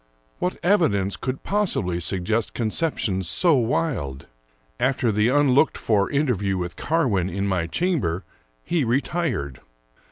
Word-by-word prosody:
What 180 - -1
evidence 150 - +2
could 130 0 -4
possibly 175 - 0
suggest 100 +6 -1
conceptions 110 - -1
so 170 - +3
wild? 120 - -1 0.5
After 130 -3 +1
the 105 +1 +2
unlooked 140 +1 +3
for 100 -3 +1
interview 115 -10 0
with 90 -1 -4
Carwin 120 - 0
in 100 +2 -2
my 90 -4 0
chamber, 95 - -1 0.4
he 170 -4 0
retired. 125 - -1
115 Hz, 120 wpm, -23 LUFS, 95-150 Hz, 0.5 s, so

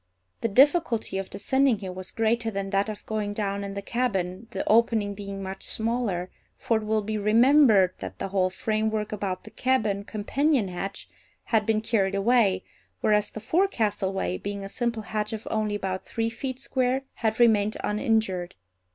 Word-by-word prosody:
The - - +1
difficulty 245 - +3
of 195 - -5
descending 265 +5 +2
here 195 -2 -6
was 185 0 -6
greater 225 0 +1
than 195 -2 -4
that 195 +2 +1
of 215 - -7
going 210 -2 -2
down 200 -1 -2
in 200 0 -5
the 200 - -4
cabin, 200 -4 -2
the 195 - -4
opening 220 -2 +3
being 200 -1 -6
much 190 0 -6
smaller, 220 -6 -1 0.3
for 230 - +1
it 220 - -4
will 215 0 +1
be 215 +1 -2
remembered 220 -3 +5
that 95 -1 -7
the - - -4
whole 185 -1 +2
framework 215 +2 -1
about 195 -3 -3
the - - -12
cabin 220 -6 0
companion 225 +3 0
hatch 195 +2 -6 0.4
had 220 -2 +1
been 220 -1 +2
carried 200 -4 +1
away, 200 -3 +3 0.4
whereas 210 -1 +2
the - - -7
forecastle 220 - +1
way, 190 -1 -2
being 200 0 -5
a 195 - -6
simple 235 -1 -1
hatch 210 +2 -3
of 220 - -6
only 215 -1 0
about 190 -2 -3
three 225 0 -1
feet 260 +2 -4
square, 260 0 0
had 220 0 -1
remained 215 -3 +4
uninjured. 210 -4 0
215 Hz, 175 wpm, -26 LUFS, 195-230 Hz, 0.4 s, remembered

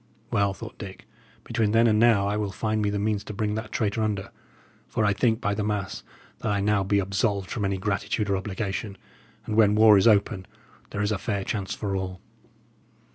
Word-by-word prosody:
"Well," 100 -1 +2
thought 115 +2 -10
Dick, 95 -3 -9 0.4
"between 110 -2 0
then 115 +1 +5
and 110 -2 +4
now 110 -4 +4
I 100 - 0
will 105 -1 -1
find 110 +3 -1
me 105 - +1
the 100 - -1
means 105 0 0
to 105 - -7
bring 105 +1 -1
that 110 0 -5
traitor 110 -1 0
under; 100 -2 -2 0.6
for 110 - 0
I 100 - +3
think, 110 +2 +1
by 105 -5 0
the 105 +1 -2
mass, 100 -2 -2 0.4
that - - -1
I 100 - +1
be 100 - -1
now 105 -1 +3 0.2
absolved 100 0 -1
from 105 -4 -1
any 95 0 0
gratitude 100 +1 -1
or 100 - +1
obligation; 100 +1 -4 0.5
and 110 - -3
when 105 -2 +5
war 105 -2 +7
is 95 - +4
open, 100 -3 +3 0.4
there 100 - -2
is 105 - 0
a 105 - -1
fair 100 -2 -2
chance 95 -1 -3
for 100 -2 -3
all." 95 -1 -4
105 Hz, 210 wpm, -26 LUFS, 100-110 Hz, 0.6 s, war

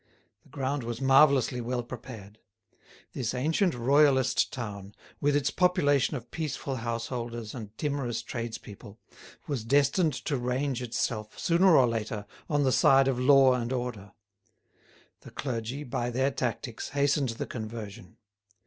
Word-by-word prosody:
The - - -24
ground 140 0 -2
was 115 0 -4
marvellously 135 -2 +4
well 120 +1 -2
prepared. 115 -4 -10 0.7
This 125 -1 -2
ancient 160 +7 +1
royalist 135 +1 +3
town, 105 -5 -7 0.2
with 145 0 +2
its 140 -1 +1
population 150 -7 +2
of 120 -1 -12
peaceful 145 -4 -4
householders 115 -1 -4
and 110 -3 -9
timorous 140 -6 -2
tradespeople, 110 -3 -7 0.5
was 140 -7 -3
destined 140 - +2
to 145 - 0
range 125 +1 -1
itself, 115 -2 -3
sooner 175 0 +4
or 130 - +6
later, 110 -3 -3 0.2
on 145 -1 +2
the 130 - +2
side 135 +1 +5
of 130 -2 0
law 135 0 +6
and 120 -1 -2
order. 120 -6 -4 1.1
The - - -13
clergy, 125 +1 -4
by 120 -2 -3
their 130 +3 0
tactics, 120 -2 -4
hastened 140 -1 +1
the - - -3
conversion. 110 -3 -8
125 Hz, 135 wpm, -28 LUFS, 115-140 Hz, 1.1 s, or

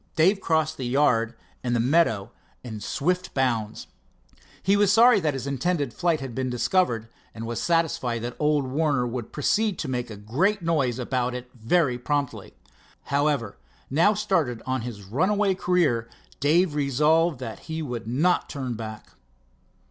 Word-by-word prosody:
Dave 190 +5 +3
crossed 160 -2 +1
the 130 - -3
yard 120 -4 +2 0.3
and 120 -1 0
the - - +1
meadow 120 -6 +2 0.3
in 110 -4 -6
swift 180 - -2
bounds. 115 -5 -1 0.8
He 195 +2 +3
was 205 -1 +4
sorry 230 0 +6
that 150 -6 0
his 130 -1 -4
intended 140 -1 -1
flight 170 -4 0
had 135 -3 -6
been 130 +1 -2
discovered, 125 - +1 0.3
and 115 0 -6
was 115 0 -3
satisfied 150 -9 0
that 120 0 -4
old 150 -2 +2
Warner 140 -1 +1
would 120 -1 -5
proceed 205 +7 +1
to 155 - -4
make 125 -2 -3
a 110 - -8
great 170 - 0
noise 140 -8 +1
about 125 -1 -1
it 125 0 -8
very 125 +2 +1
promptly. 145 +1 -3 0.6
However, 140 -7 0 0.3
now 170 +9 +4
started 170 - 0
on 130 -1 -1
his 110 -4 -7
runaway 190 - +1
career, 170 -12 +1 0.3
Dave 160 +4 +3
resolved 150 +3 +2
that 115 -4 -7
he 160 0 -3
would 120 -5 -5
not 155 +10 +1
turn 130 -4 -4
back. 110 -1 -8
140 Hz, 155 wpm, -25 LUFS, 120-165 Hz, 0.8 s, sorry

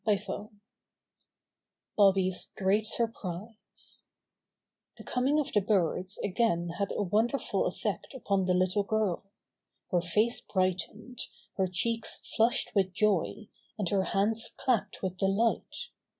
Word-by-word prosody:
STORY 210 -2 +3
XVI 205 +1 -6 1.5
Bobby's 190 -2 +3
Great 200 +3 +2
Surprise 220 -2 -4 0.9
The - - -10
coming 270 +4 +1
of 295 - -2
the 210 - +4
birds 190 -1 +1
again 185 -4 +1
had 200 - 0
a - - +1
won 210 +5 +3
derful 275 +3 -1
effect - - -3
upon 200 -6 0
the 180 0 +2
little 185 +3 +2
girl. 200 -2 -1 0.6
Her 175 -2 +3
face 210 +7 +1
brightened, 190 +6 -2 0.4
her 190 -1 +2
cheeks 225 +6 0 0.2
flushed 230 +2 +3
with 190 -3 +2
joy, 210 +1 +1 0.3
and 200 -5 -1
her 195 -2 +2
hands 215 +3 +2
clapped 240 -6 0
with 185 -1 -2
delight. 195 +5 0
200 Hz, 125 wpm, -30 LUFS, 185-220 Hz, 1.5 s, the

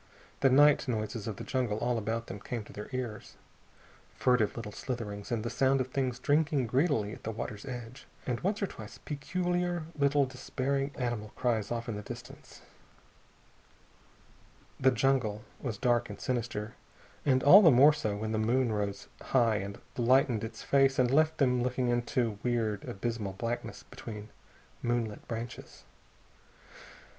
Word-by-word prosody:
The 135 - +5
night 145 +2 +5
noises 110 -2 -2
of 110 - -3
the - - -7
jungle 125 -6 -1
all 120 +1 0
about 115 +2 -2
them 100 - -7
came 115 +2 -4
to - - -14
their 105 - -7
ears. 120 -5 -5 0.8
Furtive 125 -5 +2
little 110 -3 -5
slitherings, 105 -4 -5
and 115 -2 0
the 120 - -2
sound 135 +2 +3
of 130 0 -1
things 130 -3 -1
drinking 145 -2 +2
greedily 120 -4 +1
at - - -10
the - - -4
water's 105 -1 -5
edge, 125 0 -7 0.2
and 125 -2 -1
once 200 +3 -1
or - - +4
twice 110 - -9
peculiar 175 +3 -2
little 140 -1 +3
despairing 135 +1 -2
small 125 - -3
animal 110 -3 -3
cries 115 -4 0
off 120 +1 -3
in 115 - -3
the - - -5
darkness. 120 +3 -10 2.2
The 130 - +5
jungle 125 -4 +1 0.2
was 120 -6 -4
dark 120 -1 +2
and 105 - -8
sinister, 115 -3 -2 0.5
and 130 -2 +3
all 185 +9 +10
the 175 - +8
more 140 +3 +7
so 110 -9 -2
when 110 +1 -3
the 110 - 0
moon 120 +2 +2
rose 100 -2 -2
high 115 -5 +2
and 100 0 -5 0.2
lightened 125 -1 +3
its 110 0 -6
face 135 -1 +3
and 125 -1 +3
left 155 +2 +3
them 125 -3 +3
looking 125 0 0
into 120 -3 0
weird, 115 -4 -1
abysmal 105 -1 -3
blackness 115 +5 -4
between 105 -2 -9 0.5
moonlit 120 -3 -2
branches. 115 +1 -7
120 Hz, 160 wpm, -30 LUFS, 110-135 Hz, 2.2 s, all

